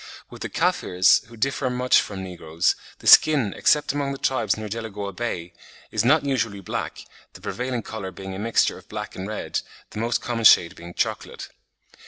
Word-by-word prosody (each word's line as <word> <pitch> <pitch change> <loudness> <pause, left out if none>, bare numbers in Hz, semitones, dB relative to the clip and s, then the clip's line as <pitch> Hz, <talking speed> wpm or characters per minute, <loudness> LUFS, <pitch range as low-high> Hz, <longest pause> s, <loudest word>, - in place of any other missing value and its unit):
With - - -11
the - - -4
Kaffirs, 90 +1 +3
who 120 0 -14
differ 135 +2 0
much 125 0 +3
from 95 -2 -6
negroes, 85 -3 -1 0.2
"the - - -17
skin, 140 -10 +6
except 150 -2 +2
among 140 -1 -2
the - - -6
tribes 130 -7 0
near 110 0 -5
Delagoa 105 -2 -5
Bay, 90 -6 -4 0.4
is 110 -1 0
not 145 +5 +4
usually 115 -7 -1
black, 95 - -5 0.3
the - - -13
prevailing 125 -1 -3
colour 110 -4 -6
being 95 +1 -8
a 95 - -6
mixture 115 +2 +1
of - - -21
black - - -6
and 95 +1 -5
red, 110 0 -3 0.3
the - - -6
most 115 +1 0
common 115 -2 -3
shade 85 -4 +6
being 85 +1 -11
chocolate. - - -3
110 Hz, 185 wpm, -24 LUFS, 95-125 Hz, 0.4 s, skin